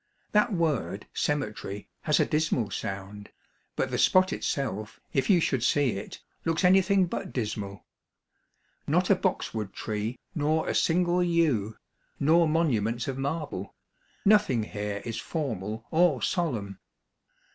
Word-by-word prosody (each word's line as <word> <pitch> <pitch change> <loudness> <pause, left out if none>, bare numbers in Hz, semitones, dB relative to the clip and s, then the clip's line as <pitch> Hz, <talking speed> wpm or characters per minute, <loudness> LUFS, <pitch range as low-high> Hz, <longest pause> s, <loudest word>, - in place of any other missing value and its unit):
That 210 +3 +3
word 145 - -1
*' - - -49 0.2
cemetery 105 -8 -3
" - - -49
has 150 - +3
a - - +4
dismal 150 -9 0
sound, 100 +2 -5 0.5
but - - -1
the - - -1
spot 185 +1 +4
itself, 110 -6 -3
if 135 - +1
you 185 -4 +6
should 135 -6 0
see 140 +2 +3
it, 100 0 -6 0.2
looks 165 +2 0
anything 190 +1 +5
but 175 - -5
dismal. 105 -4 -4 1.0
Not - - +2
a - - +7
boxwood 105 -4 -2
tree, 110 +3 -3 0.2
nor 155 -1 +1
a - - 0
single 175 +1 +2
yew, 150 - +1 0.4
nor 160 +3 +4
monuments 120 -8 +1
of 135 -1 -3
marble; 140 - -3 0.5
noth 210 +1 +5
ing 120 -4 +1
here 105 -1 -4
is 115 -1 -3
formal 115 - -4
or 165 -4 +4
solemn. 110 - -1
135 Hz, 140 wpm, -28 LUFS, 105-165 Hz, 1.0 s, a